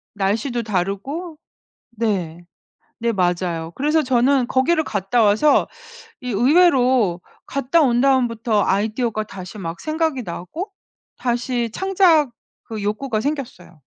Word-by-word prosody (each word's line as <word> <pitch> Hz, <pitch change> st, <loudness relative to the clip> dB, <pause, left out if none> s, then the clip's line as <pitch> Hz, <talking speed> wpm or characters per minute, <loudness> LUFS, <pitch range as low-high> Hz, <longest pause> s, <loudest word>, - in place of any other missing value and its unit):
날씨도 220 Hz, +5 st, -1 dB
다르고 220 Hz, -, -3 dB, 0.5 s
네. 190 Hz, -8 st, -2 dB, 0.6 s
네 235 Hz, 0 st, +1 dB
맞아요. 175 Hz, -3 st, -1 dB
그래서 300 Hz, +3 st, +1 dB
저는 255 Hz, 0 st, +2 dB
거기를 315 Hz, +6 st, +2 dB
갔다 205 Hz, +2 st, 0 dB
와서 220 Hz, +8 st, +4 dB, 0.5 s
이 250 Hz, -, -5 dB
의외로 250 Hz, -, +3 dB, 0.2 s
갔다 275 Hz, +4 st, +1 dB
온 245 Hz, -4 st, +3 dB
다음부터 235 Hz, -5 st, +2 dB
아이디어가 215 Hz, +2 st, 0 dB
다시 190 Hz, -1 st, -9 dB
막 170 Hz, -3 st, -6 dB
생각이 310 Hz, -4 st, -1 dB
나고 185 Hz, -, -6 dB, 0.5 s
다시 240 Hz, -1 st, -1 dB
창작 350 Hz, -, +3 dB, 0.3 s
그 220 Hz, -2 st, -6 dB
욕구가 215 Hz, +2 st, -1 dB
생겼어요. 245 Hz, -, -5 dB
235 Hz, 255 characters per minute, -21 LUFS, 200-275 Hz, 0.6 s, 와서